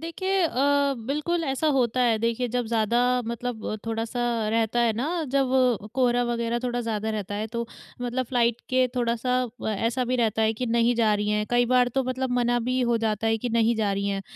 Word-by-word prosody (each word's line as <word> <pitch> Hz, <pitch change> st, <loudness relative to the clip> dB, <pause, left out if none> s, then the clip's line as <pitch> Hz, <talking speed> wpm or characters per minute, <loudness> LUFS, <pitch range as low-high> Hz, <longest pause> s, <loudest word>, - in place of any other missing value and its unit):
देखिए 375 Hz, +4 st, -1 dB
अ, -, -, +2 dB, 0.6 s
बिल्कुल 315 Hz, +5 st, -1 dB
ऐसा 270 Hz, +2 st, -1 dB
होता 255 Hz, -4 st, +2 dB
है, 235 Hz, -3 st, +3 dB
देखिए 230 Hz, +2 st, -1 dB
जब 245 Hz, 0 st, -2 dB
ज़्यादा 225 Hz, 0 st, +1 dB, 0.3 s
मतलब 235 Hz, -2 st, -4 dB
थोड़ा-सा 225 Hz, +2 st, -3 dB, 0.3 s
रहता 225 Hz, +1 st, +1 dB
है 235 Hz, -1 st, +3 dB
ना, 320 Hz, +7 st, -1 dB
जब 270 Hz, -1 st, +3 dB, 0.5 s
कोहरा 245 Hz, -2 st, +2 dB
वग़ैरह 235 Hz, 0 st, -1 dB
थोड़ा 245 Hz, -1 st, -1 dB
ज़्यादा 220 Hz, -2 st, -2 dB
रहता 205 Hz, -2 st, -4 dB
है, 210 Hz, +2 st, -2 dB
तो 235 Hz, +1 st, -4 dB, 0.4 s
मतलब 245 Hz, +1 st, -1 dB
फ्लाइट 235 Hz, -1 st, +1 dB
के 255 Hz, 0 st, +3 dB
थोड़ा-सा 245 Hz, +1 st, 0 dB, 0.3 s
ऐसा 230 Hz, +5 st, -1 dB
भी 250 Hz, +1 st, 0 dB
रहता 225 Hz, -2 st, +1 dB
है 220 Hz, 0 st, +3 dB
कि 250 Hz, +3 st, -3 dB
नहीं 235 Hz, +1 st, +2 dB
जा 225 Hz, -2 st, +2 dB
रही 210 Hz, 0 st, -1 dB
हैं, 210 Hz, 0 st, 0 dB
कई 245 Hz, 0 st, +3 dB
बार 250 Hz, 0 st, +3 dB
तो 270 Hz, -, +2 dB
मतलब 255 Hz, 0 st, -2 dB
मना 240 Hz, 0 st, +2 dB
भी 255 Hz, +2 st, -1 dB
हो 240 Hz, -1 st, +2 dB
जाता 220 Hz, -1 st, -1 dB
है 225 Hz, 0 st, +2 dB
कि 245 Hz, -, -3 dB
नहीं 230 Hz, 0 st, +2 dB
जा 210 Hz, -2 st, 0 dB
रही 200 Hz, +1 st, -1 dB
हैं। 195 Hz, -1 st, -2 dB
235 Hz, 205 wpm, -25 LUFS, 225-255 Hz, 0.6 s, है